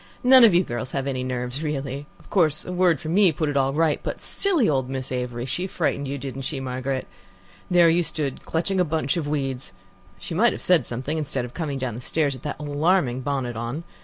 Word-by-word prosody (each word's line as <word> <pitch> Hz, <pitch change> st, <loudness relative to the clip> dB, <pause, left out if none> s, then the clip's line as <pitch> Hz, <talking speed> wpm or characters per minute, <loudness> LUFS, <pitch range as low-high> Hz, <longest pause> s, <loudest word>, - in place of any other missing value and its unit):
"None 255 Hz, 0 st, +8 dB
of 215 Hz, -6 st, +7 dB
you 180 Hz, -, +5 dB
girls 120 Hz, -4 st, -5 dB
have 135 Hz, -1 st, -1 dB
any 130 Hz, -2 st, -2 dB
nerves, 125 Hz, +1 st, -3 dB
really. 140 Hz, -2 st, -3 dB
Of -, -, -20 dB
course, 155 Hz, -6 st, +2 dB
a -, -, -5 dB
word 180 Hz, -4 st, +3 dB
from 155 Hz, +3 st, -4 dB
me 195 Hz, -2 st, +5 dB
put 155 Hz, 0 st, -1 dB
it 145 Hz, -, -3 dB
all 135 Hz, -1 st, +2 dB
right, 155 Hz, +1 st, +2 dB
but -, -, -4 dB
silly 355 Hz, -, +1 dB
old 130 Hz, -4 st, +1 dB
Miss 130 Hz, -1 st, -4 dB
Avery 125 Hz, -1 st, -3 dB
she 180 Hz, +8 st, -2 dB
frightened 140 Hz, -6 st, -1 dB
you, 140 Hz, +1 st, -3 dB
didn't 135 Hz, 0 st, -6 dB
she, 135 Hz, +1 st, -3 dB
Margaret? 130 Hz, 0 st, -3 dB, 0.6 s
There 175 Hz, -2 st, +6 dB
you 165 Hz, +2 st, +4 dB
stood 150 Hz, -4 st, -2 dB
clutching 180 Hz, +4 st, 0 dB
a -, -, +5 dB
bunch 155 Hz, -4 st, -1 dB
of 165 Hz, -4 st, -2 dB
weeds. 135 Hz, -3 st, -2 dB, 0.4 s
She -, -, -7 dB
might -, -, +4 dB
have -, -, -7 dB
said -, -, +3 dB
something, 135 Hz, +6 st, -3 dB
instead 135 Hz, -4 st, -2 dB
of 120 Hz, -, -10 dB
coming 150 Hz, -5 st, -3 dB
down 130 Hz, -3 st, -3 dB
the 120 Hz, -, -7 dB
stairs 145 Hz, +2 st, +1 dB
with 130 Hz, -, -10 dB
that 145 Hz, -, -4 dB
alarming 145 Hz, -2 st, +1 dB
bonnet 130 Hz, -3 st, -2 dB
on. 120 Hz, +8 st, -4 dB
140 Hz, 225 wpm, -24 LUFS, 130-165 Hz, 0.6 s, None